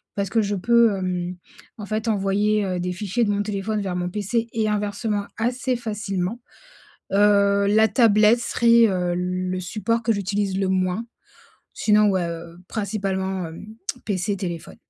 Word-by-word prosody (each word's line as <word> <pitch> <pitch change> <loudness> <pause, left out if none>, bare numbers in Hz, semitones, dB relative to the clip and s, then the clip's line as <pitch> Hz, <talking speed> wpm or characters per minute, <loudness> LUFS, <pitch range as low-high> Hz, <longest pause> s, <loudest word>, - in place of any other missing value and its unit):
parce 200 -2 -1
que 225 - +2
je 205 -1 -1
peux, 235 +3 +4
hem, 180 -1 -3 0.4
en 210 - -7
fait, 215 +2 -3
envoyer, 205 +1 +1
heu, 185 -1 -2
des 180 - -2
fichiers 200 +5 -1
de 215 - +1
mon 205 0 0
téléphone 210 +1 -2
vers 190 -2 -3
mon 180 0 -2
PC 215 +4 -1
et 220 -1 0
inversement, 210 0 -1
assez 250 +2 -1
facilement. 210 -1 -3 0.7
Heu, 200 0 +4
la 215 +2 +4
tablette 215 +1 +4
serait, 235 -1 +4
heu, 180 -2 0
le 180 +1 -2
support 215 +5 -1
que 225 0 +2
j'utilise 200 -1 -1
le 195 -1 0
moins. 185 +4 0 0.7
Sinon, 210 -1 +3
ouais, 185 -3 0
heu, 170 0 -8
principalement, 190 -3 -2
hem, 160 +4 -10 0.4
PC, 200 0 -1
téléphone. 175 -4 -6
200 Hz, 155 wpm, -23 LUFS, 185-215 Hz, 0.7 s, peux